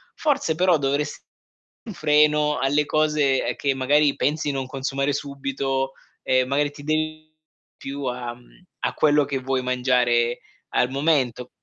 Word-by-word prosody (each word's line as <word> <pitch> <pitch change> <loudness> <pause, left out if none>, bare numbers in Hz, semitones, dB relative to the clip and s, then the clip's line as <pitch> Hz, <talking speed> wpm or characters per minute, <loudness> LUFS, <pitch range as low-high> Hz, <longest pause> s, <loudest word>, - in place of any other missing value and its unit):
Forse 275 - 0
però 180 -1 +3
dovresti 140 +1 -2
mettere - - -51 0.6
un - - -6
freno 150 -2 +3
alle 145 +2 +2
cose, 150 -3 +1
ehm, - - -2
che 140 -1 0
magari 145 +2 +3
pensi 150 0 0
non 135 -1 -3
consumare 135 +1 -2
subito, 135 -1 -2 0.3
e 130 0 +2
magari 145 +2 0
ti 145 0 -12
dedichi 155 +1 -1
di 155 0 -47
più 140 +1 -6
a 125 -1 -3
mhmm, 125 +9 -22 0.2
a - - -1
quello 150 -1 +3
che 140 -1 -2
vuoi 130 0 -1
mangiare 125 -2 +1 0.3
al 125 - +1
momento. 135 -4 0
140 Hz, 155 wpm, -23 LUFS, 130-150 Hz, 0.6 s, però